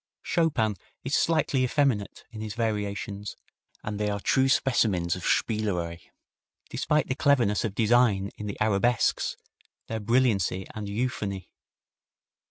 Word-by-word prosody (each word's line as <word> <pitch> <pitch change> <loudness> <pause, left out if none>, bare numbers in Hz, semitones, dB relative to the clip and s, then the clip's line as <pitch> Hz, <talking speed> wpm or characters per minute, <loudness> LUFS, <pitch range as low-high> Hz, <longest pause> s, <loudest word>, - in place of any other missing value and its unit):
Chopin 120 - +1 0.3
is 135 - -4
slightly 155 -5 +2
effeminate 125 -6 0
in 110 -2 -8
his 110 0 -5
variations, 105 -2 -3 0.5
and 105 -1 -4
they 105 0 0
are 100 0 -2
true 130 +5 +2
specimens 100 -11 +2
of 90 - -7
spielerei, 90 -6 0 0.7
despite 150 0 +1
the - - 0
cleverness 130 -7 +2
of 105 -3 -3
design 110 -4 +3
in 105 - -6
the 100 - -5
arabesques, 110 +3 +1 0.5
their 110 - -4
brilliancy 105 -5 +1
and 105 -2 -5
euphony. 100 -4 -3
110 Hz, 125 wpm, -27 LUFS, 100-125 Hz, 0.7 s, design